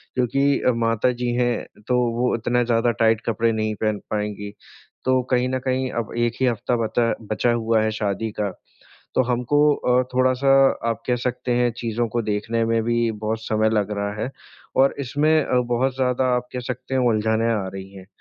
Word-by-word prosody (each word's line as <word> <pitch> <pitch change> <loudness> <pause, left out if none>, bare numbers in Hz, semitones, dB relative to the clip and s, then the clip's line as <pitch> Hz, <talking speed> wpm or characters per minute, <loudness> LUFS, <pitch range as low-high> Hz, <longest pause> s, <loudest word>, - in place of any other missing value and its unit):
क्योंकि 135 +3 +2 0.2
माताजी 120 +2 0
हैं 120 -3 -2
तो 125 -1 +2 0.2
वो 125 - +2
उतना 120 +1 +1
ज़्यादा 120 0 +2
टाइट 110 0 +3
कपडे 115 0 +1
नहीं 110 -1 -1
पहन 110 -1 0
पाएँगी। 105 -1 -3 0.5
तो 130 0 +3
कहीं 125 0 +2
न 130 0 -1
कहीं 130 0 0
अब - - -12
1 120 0 +1
ही - - +4
हफ़्ता 120 +1 0
बता 115 +1 +1 0.2
बचा 120 +2 +2
हुआ 115 -1 +1
है 110 - 0
शादी 105 0 -2
का। 100 -2 0 0.6
तो 130 - +4
हमको 145 +5 +2
अ, 125 -1 +2
थोड़ा-सा 130 +1 +2 0.4
आप 115 0 -2
कह 125 -1 +2
सकते 125 0 -2
हैं 120 0 +2
चीज़ों 115 0 -1
को 120 +1 -1
देखने 110 +2 -1
में 115 0 +1
भी 120 -1 +1
बहुत 110 +1 -3
समय 110 0 +2
लग 105 -2 0
रहा 100 0 -2
है 125 - -2 0.5
और 135 +1 +4
इसमें 145 +4 0
अ, 125 - 0
बहुत 125 +2 0
ज़्यादा 130 0 +1
आप 125 0 -4
कह 125 - -3
सकते 125 +2 -5
हो 125 -2 +3
उलझाने 110 +1 +1
आ 100 -4 -1
रही 95 0 -8
हैं। 95 -1 -11
120 Hz, 190 wpm, -22 LUFS, 110-125 Hz, 0.6 s, ही